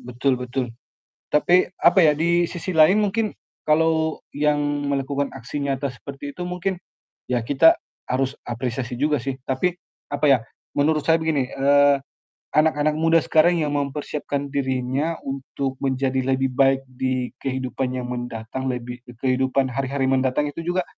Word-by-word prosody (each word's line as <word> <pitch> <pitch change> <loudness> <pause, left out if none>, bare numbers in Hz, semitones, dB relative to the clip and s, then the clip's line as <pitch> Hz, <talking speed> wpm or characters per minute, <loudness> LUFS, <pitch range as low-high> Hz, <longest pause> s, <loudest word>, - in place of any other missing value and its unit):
betul 125 +1 -1
betul. 125 -1 -3 0.6
Tapi, 175 +4 +4
apa 175 - +5
ya, 150 - +6
di 170 +3 +2
sisi 175 0 -5
lain 160 +7 +6
mungkin 210 +1 0 0.3
kalau 160 +1 +2 0.2
yang 150 0 +2 0.3
melakukan 140 0 -1
aksi 135 +2 -6
nyata 140 0 -1
seperti 140 +2 -8
itu 180 - -4
mungkin 180 +1 -2 0.5
ya 125 -2 0
kita 145 +7 +5 0.3
harus 135 +2 -1
apresiasi 120 +1 -3
juga 150 +1 +2
sih. 135 +2 -3
Tapi, 135 +7 +1 0.4
apa 145 +1 -1
ya, 135 - +6 0.4
menurut 150 +1 +2
saya 160 - +6
begini, 155 -5 0
eee, 140 +1 +4 0.5
anak-anak 155 0 +2
muda 165 +1 +4
sekarang 165 +1 +3
yang 150 - -1
mempersiapkan 145 0 -3
dirinya 135 +3 -1
untuk 135 0 -4
menjadi 130 -1 0 0.2
lebih 135 0 0
baik 135 +1 +3
di 130 -1 -2
kehidupan 130 -1 -2
yang 125 -1 -4
mendatang, 120 +1 -5
lebih 125 -1 -4 0.2
kehidupan 130 0 +1
hari-hari 135 +2 -1
mendatang 135 +2 +1
itu 145 - -7
juga 180 +1 +1
140 Hz, 145 wpm, -23 LUFS, 130-155 Hz, 0.6 s, ya